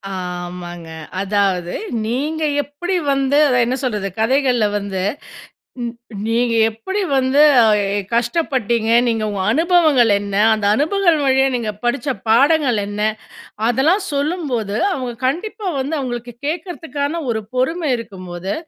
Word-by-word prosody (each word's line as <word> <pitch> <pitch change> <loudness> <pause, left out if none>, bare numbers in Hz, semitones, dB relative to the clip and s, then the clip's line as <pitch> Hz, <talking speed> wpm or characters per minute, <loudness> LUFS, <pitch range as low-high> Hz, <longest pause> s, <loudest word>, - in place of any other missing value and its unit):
ஆமாங்க. 175 -2 -6 0.3
அதாவது 195 -3 0 0.3
நீங்க 295 +8 -2 0.2
எப்படி 350 +7 -4 0.2
வந்து 275 +1 +1
அத 255 - +2
என்ன 250 +2 -1
சொல்றது, 210 -5 -2
கதைகள்ல 250 0 +2
வந்து 200 -2 -4 0.8
நீ 240 - -2 0.4
நீங்க 235 +1 +1 0.2
எப்படி 305 - -4
வந்து 265 +2 +3 0.2
அ, - - +5 0.3
எ, - - +1 0.2
கஷ்டப்பட்டீங்க, 235 -3 0 0.2
நீங்க 225 -2 0
உங்க 200 -2 -3
அனுபவங்கள் 310 - +4
என்ன? 200 -1 -5 0.2
அந்த 215 -2 -2
அனுபவங்கள் 340 - +2
வழியா 265 0 +4
நீங்க 230 -3 -2
படிச்ச 275 +4 -1 0.2
பாடங்கள் 270 0 +4
என்ன? 205 +1 -5 0.7
அதெல்லாம் 305 - +2
சொல்லும்போது, 280 - -2 0.2
அவுங்க 255 -8 -3
கண்டிப்பா 420 - -3
வந்து 280 +4 -2
அவுங்களுக்கு 240 -2 -5
கேட்கறதுக்கான 325 -2 -3
ஒரு 220 -1 -2
பொறுமை 305 +5 0
இருக்கும்போது, 185 -4 -6
250 Hz, 120 wpm, -19 LUFS, 215-295 Hz, 0.8 s, அ